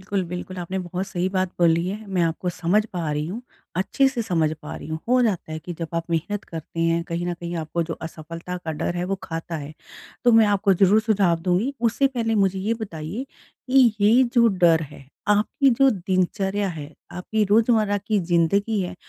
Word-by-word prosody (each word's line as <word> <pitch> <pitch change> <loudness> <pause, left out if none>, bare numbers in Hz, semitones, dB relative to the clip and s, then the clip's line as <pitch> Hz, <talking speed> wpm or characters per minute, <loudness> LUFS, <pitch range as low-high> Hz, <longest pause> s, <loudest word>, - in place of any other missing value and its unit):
बिल्कुल, 195 0 -1
बिल्कुल 180 +2 -6
आपने 185 +2 -3
बहुत 180 +1 -4
सही 185 -1 -1
बात 185 -1 0
बोली 170 0 +3
है। 210 +2 -6
मैं 185 -3 0
आपको 165 +2 -1
समझ 180 +5 +1
पा 165 -4 -2
रही 150 +1 -2
हूँ, 210 +8 -5 0.4
अच्छे 270 +8 +2
से 250 -3 -3
समझ 165 -7 +1
पा 150 - -7
रही - - -9
हूँ। 160 0 -3
हो 250 0 +4
जाता 190 -8 -1
है 155 - -3
कि 175 +3 -7
जब 165 - -4
आप 165 +1 -3
मेहनत 195 +6 -2
करते 165 0 -7
हैं 165 0 +2
कहीं 170 0 -3
न 175 - -1
कहीं 170 0 -5
आपको 165 +1 -2
जो 165 0 -4
असफलता 165 +2 -7
का 160 -3 -5
डर 175 +3 -3
है 175 - -1
वो 195 +1 -1
खाता 165 0 -5
है। 145 0 -7 0.5
तो 240 - +6
मैं 225 -1 +6
आपको 200 0 +3
ज़रूर 195 +4 +4
सुझाव 200 -6 +2
दूँगी। 185 +9 +1
उससे 240 +4 +2
पहले 230 -4 -1
मुझे 195 -2 +2
ये 215 +4 0
बताइए 180 - -5 0.5
कि 255 -4 +5
ये 220 +5 +6
जो 235 -1 +6
डर 170 -5 +3
है, 135 - -13 0.2
आपकी 215 +6 +3
जो 270 +3 +4
दिनचर्या 190 +1 0
है, 155 -3 -7 0.2
आपकी 210 +4 -1
रोज़मर्रा 215 0 +3
की 215 -2 +2
ज़िंदगी 185 +5 +1
है 180 - -4
185 Hz, 210 wpm, -23 LUFS, 170-210 Hz, 0.5 s, तो